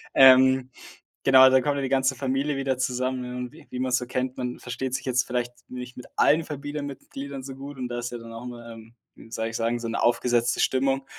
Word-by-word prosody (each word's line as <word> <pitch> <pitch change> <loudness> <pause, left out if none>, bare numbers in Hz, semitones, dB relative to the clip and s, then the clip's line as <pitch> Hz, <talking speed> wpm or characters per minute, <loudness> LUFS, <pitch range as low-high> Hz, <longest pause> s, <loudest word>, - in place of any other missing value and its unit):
Ähm, 130 0 +7 0.5
genau, 130 -1 +8
dann 130 0 +5
kommt 145 +1 0
ja - - -1
die 130 - -2
ganze 135 0 +2
Familie 135 +3 -1
wieder 135 -1 -1
zusammen 125 0 -2
und 125 -1 -5
wie - - -16
wie 125 - -5
man‘s 130 -1 +1
so 125 - -4
kennt, 125 +1 -2
man 125 -1 -3
versteht 125 +1 -4
sich 135 - -5
jetzt 125 0 +1
vielleicht 120 0 -2 0.2
nicht 125 -1 -8
mit 125 - -9
allen 160 +2 +4
Familienmitgliedern 140 -2 -6
so 135 0 -7
gut 140 +1 -9
und 125 -1 -4
da 120 0 -3
ist 120 0 -4
ja 120 - -5
dann 115 0 -10
auch 115 +1 -8
immer, 120 -1 -8
ähm, 115 0 -13 0.2
wie - - -15
soll 110 0 -2
ich 115 - -6
sagen, 115 +1 0
so 115 - -4
‘ne 115 - -2
aufgesetzte 120 0 +2
Stimmung. 135 +1 +1
130 Hz, 230 wpm, -25 LUFS, 120-135 Hz, 0.5 s, genau